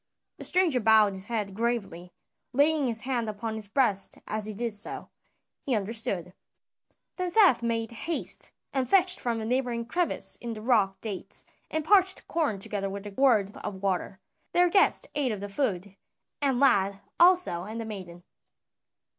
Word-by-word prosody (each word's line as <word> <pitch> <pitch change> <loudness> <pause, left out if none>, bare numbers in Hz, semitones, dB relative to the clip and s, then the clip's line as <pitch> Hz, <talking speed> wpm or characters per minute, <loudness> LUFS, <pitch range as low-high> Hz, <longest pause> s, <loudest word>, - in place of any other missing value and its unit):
The - - -5
stranger 355 -8 +2
bowed 220 -2 +5
his 190 +1 -4
head 210 -4 -2
gravely, 195 -6 -3 0.4
laying 290 +1 +3
his 225 -2 0
hand 240 -3 -1
upon 220 +2 -4
his 220 -2 -3
breast 205 -4 +1
as 215 0 -2
he 215 - -4
did 235 +2 -2
so. 205 +1 -5 0.5
He 260 - 0
understood. 195 -4 -2 0.8
Then 365 -1 -1
Seth 365 - +5
made 230 -1 -1
haste 320 +8 -3 0.2
and 260 -2 -1
fetched 370 -1 +3
from 235 -2 -2
a 220 - -4
neighboring 240 -1 -1
crevice 350 +8 -1
in 235 -1 -5
the 215 - -8
rock 210 -6 +2
dates 205 -5 -5 0.2
and 315 -1 -2
parched 380 +1 +3
corn 310 - 0
together 195 0 -3
with 200 +1 -7
a 205 - -6
gourd 210 -4 +2
of 190 -1 -7
water. 190 0 -1 0.3
Their 355 0 +4
guest 390 +1 +3
ate 285 -4 0
of 210 - -4
the 205 - -5
food, 200 -4 -2 0.5
the 280 -1 +3
lad 200 -7 +2 0.2
also 345 - +5
and 220 +3 -6
the 225 - -4
maiden. 180 -5 -8
225 Hz, 165 wpm, -28 LUFS, 200-270 Hz, 0.8 s, bowed